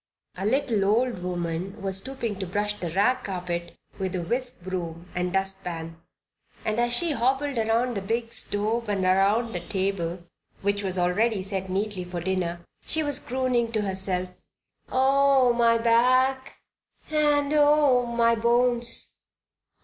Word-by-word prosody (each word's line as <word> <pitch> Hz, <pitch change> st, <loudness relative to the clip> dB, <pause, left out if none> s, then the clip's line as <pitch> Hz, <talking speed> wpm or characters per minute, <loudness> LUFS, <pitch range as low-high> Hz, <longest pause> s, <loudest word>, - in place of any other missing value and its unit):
A 190 Hz, +3 st, -2 dB
little 245 Hz, -4 st, +1 dB
old 225 Hz, +1 st, +1 dB
woman 175 Hz, +1 st, -3 dB
was 195 Hz, -1 st, 0 dB
stooping 230 Hz, -3 st, -5 dB
to 190 Hz, -, -3 dB
brush 205 Hz, +3 st, -1 dB
the 180 Hz, -5 st, -5 dB
rag 205 Hz, +9 st, +2 dB
carpet 175 Hz, -2 st, -4 dB, 0.2 s
with 190 Hz, -1 st, -2 dB
a 180 Hz, -, -1 dB
whisk 245 Hz, +7 st, -3 dB
broom 175 Hz, -2 st, -5 dB
and 180 Hz, 0 st, -1 dB
dustpan, 180 Hz, -4 st, -3 dB, 0.6 s
and 215 Hz, +1 st, 0 dB
as 240 Hz, 0 st, +1 dB
she 330 Hz, +7 st, +2 dB
hobbled 265 Hz, +1 st, 0 dB
around 230 Hz, +3 st, +1 dB
the 200 Hz, -, -3 dB
big 230 Hz, +3 st, -2 dB
stove 220 Hz, +1 st, -2 dB
and 195 Hz, -2 st, 0 dB
around 200 Hz, +5 st, +2 dB
the 175 Hz, -, -2 dB
table, 185 Hz, -2 st, -2 dB, 0.4 s
which 200 Hz, 0 st, +1 dB
was 190 Hz, -1 st, -2 dB
already 195 Hz, +4 st, +1 dB
set 190 Hz, -1 st, -4 dB
neatly 195 Hz, 0 st, -2 dB
for 180 Hz, 0 st, -5 dB
dinner, 175 Hz, -1 st, -2 dB, 0.2 s
she 315 Hz, -, 0 dB
was 290 Hz, -2 st, 0 dB
crooning 250 Hz, -3 st, 0 dB
to 215 Hz, -2 st, +1 dB
herself: 190 Hz, -2 st, -1 dB, 0.6 s
"Oh, 270 Hz, -1 st, +4 dB
my 235 Hz, -1 st, +4 dB
back 255 Hz, +3 st, +3 dB, 0.6 s
and 295 Hz, -1 st, +2 dB
oh, 290 Hz, -4 st, +5 dB
my 235 Hz, 0 st, +3 dB
bones! 240 Hz, +1 st, +1 dB
210 Hz, 145 wpm, -26 LUFS, 185-245 Hz, 0.6 s, oh